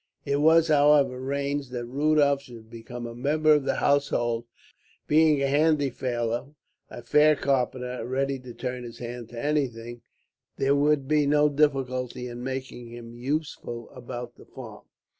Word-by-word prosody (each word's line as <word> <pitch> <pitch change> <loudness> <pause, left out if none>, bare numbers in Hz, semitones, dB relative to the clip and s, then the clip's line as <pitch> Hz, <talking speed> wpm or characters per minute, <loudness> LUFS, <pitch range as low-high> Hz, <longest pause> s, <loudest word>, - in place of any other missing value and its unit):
It 140 - 0
was, 160 +2 +4
however, 145 -3 +4
arranged 140 +1 -3
that 120 -1 -4
Rudolph 140 +2 +2
should 115 -4 -14
become 120 +1 -8
a 115 - -6
member 150 +5 +2
of 145 -2 +1
the - - 0
household. 120 -5 +1 0.6
Being 155 -1 +4
a - - +2
handy 145 -1 +2
fellow, 120 +3 -3 0.3
a 120 - -9
fair 150 +4 +4
carpenter, 125 -2 -1
and 115 - -6
ready 135 +1 -1
to 125 -1 -10
turn 125 -1 -4
his 120 -1 -9
hand 120 -1 -7
to 120 - -8
anything, 120 -6 -2 0.6
there 135 +1 +2
would 145 -1 +2
be 150 -1 +2
no 150 +1 +4
difficulty 130 -4 0
in 120 0 -7
making 130 -2 -5
him 115 0 -10
useful 120 -2 -4
about 120 -1 -8
the - - -15
farm. 115 -5 -11
130 Hz, 160 wpm, -26 LUFS, 120-145 Hz, 0.6 s, was